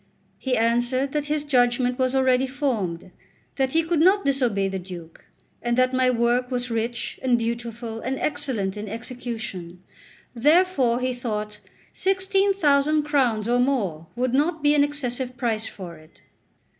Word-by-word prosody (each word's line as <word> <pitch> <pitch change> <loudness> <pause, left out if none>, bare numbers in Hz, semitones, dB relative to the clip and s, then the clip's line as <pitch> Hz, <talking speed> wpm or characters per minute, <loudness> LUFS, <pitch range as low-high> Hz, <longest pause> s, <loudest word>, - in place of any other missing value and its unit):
He 255 -2 0
answered 240 +4 +1
that 295 0 -2
his 300 0 -1
judgment 250 -2 +2
was 255 0 +1
already 260 0 +3
formed, 225 - -2 0.5
that 265 -1 0
he 325 +1 +3
could 330 -1 0
not 380 +5 +4
disobey 245 -8 +1
the 190 0 -3
Duke, 175 -3 -11 0.4
and 240 0 -1
that 255 0 +3
my 255 0 +3
work 240 +1 +1
was 250 -1 -2
rich 230 +1 -3
and 250 -2 +3
beautiful 230 0 -4
and 260 +3 -3
excellent 260 -10 -2
in 210 0 -5
execution; 220 -7 -6 0.5
therefore 275 -2 +3
he 255 0 0
thought 210 -4 -4 0.3
sixteen 390 +1 +2
thousand 300 -4 +3
crowns 250 -8 +1
or 245 +1 +2
more 200 - 0
would 250 0 -1
not 310 +3 +1
be 290 0 +5
an 290 -1 +4
excessive 255 -3 -3
price 225 -2 -1
for 175 -4 -9
it. 155 0 -20
250 Hz, 155 wpm, -24 LUFS, 225-280 Hz, 0.5 s, be